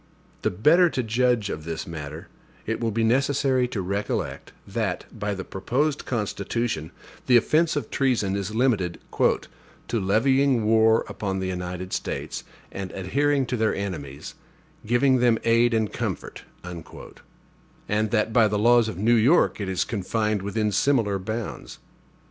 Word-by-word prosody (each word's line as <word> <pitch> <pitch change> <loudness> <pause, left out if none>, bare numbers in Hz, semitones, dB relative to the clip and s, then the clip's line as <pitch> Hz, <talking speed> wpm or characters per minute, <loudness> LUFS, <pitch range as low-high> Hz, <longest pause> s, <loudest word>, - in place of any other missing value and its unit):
The - - +1
better 165 - +4
to 130 - -2
judge 115 -2 +1
of 75 - -5
this 80 0 -4
matter, 80 -1 -7 0.4
it 115 - -2
will 115 - +1
be 115 +1 0
necessary 130 +1 +2
to 105 -6 -4
recollect, 100 +3 -3
that, - - -2
by 105 0 -3
the 95 - -5
proposed 135 +10 -1
Constitution, 105 -5 -2 0.4
the 125 - +7
offense 155 +7 +2
of 145 - -3
treason 120 -8 +1
is 100 +2 -3
limited 110 -8 +1 0.2
"to 115 - -1
levying 125 +5 +2
war 110 0 +4
upon 95 -2 -3
the 95 0 -2
United 90 0 -5
States, - - -4 0.3
and 95 -1 -5
adhering 140 +9 +1
to 125 - -2
their 110 -2 +1
enemies, 75 -9 -5 0.5
giving 130 +2 +3
them 120 -2 +4
aid 115 +1 +4
and 110 -2 0
comfort"; - - -4 1.5
and 105 +1 0
that 110 0 0
by 115 -2 +5
the 105 0 -1
laws 120 +2 +4
of 100 - -6
New 110 +5 +3
York 120 +1 +3
it 100 - -3
is 95 - 0
confined 105 0 -1
within 105 +2 -1
similar 105 -3 +2
bounds. 110 +4 -5
110 Hz, 150 wpm, -25 LUFS, 95-125 Hz, 1.5 s, the